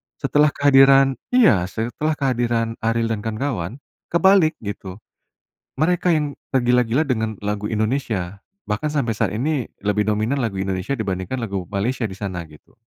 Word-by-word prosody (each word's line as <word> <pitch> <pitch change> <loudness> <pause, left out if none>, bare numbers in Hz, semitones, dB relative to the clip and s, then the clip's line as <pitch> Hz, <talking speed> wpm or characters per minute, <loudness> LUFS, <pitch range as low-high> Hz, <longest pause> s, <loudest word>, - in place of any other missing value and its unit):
Setelah 150 +1 +2
kehadiran 135 -1 +6 0.2
iya, 110 - +5
setelah 120 +10 -2
kehadiran 120 -4 -1
Ariel 115 0 0
dan 110 - -1
kawan-kawan, 115 +1 -4 0.2
kebalik, 180 -2 +4
gitu, 100 -2 -6 0.8
mereka 175 +4 +2
yang 150 -2 -2 0.2
tergila-gila 125 +1 +3
dengan 110 -7 -1
lagu 105 0 -2
Indonesia, 110 -4 -2 0.3
bahkan 105 +9 -1
sampai 115 -7 -1
saat 105 -2 0
ini 135 +2 -1 0.2
lebih 105 0 +1
dominan 110 +6 0
lagu 100 -7 -2
Indonesia 95 +6 -2
dibandingkan 100 +2 -3
lagu 100 -5 -3
Malaysia 115 +4 -2
di 95 - -7
sana, 95 -4 -5
gitu. 75 -1 -19
115 Hz, 140 wpm, -21 LUFS, 105-135 Hz, 0.8 s, kehadiran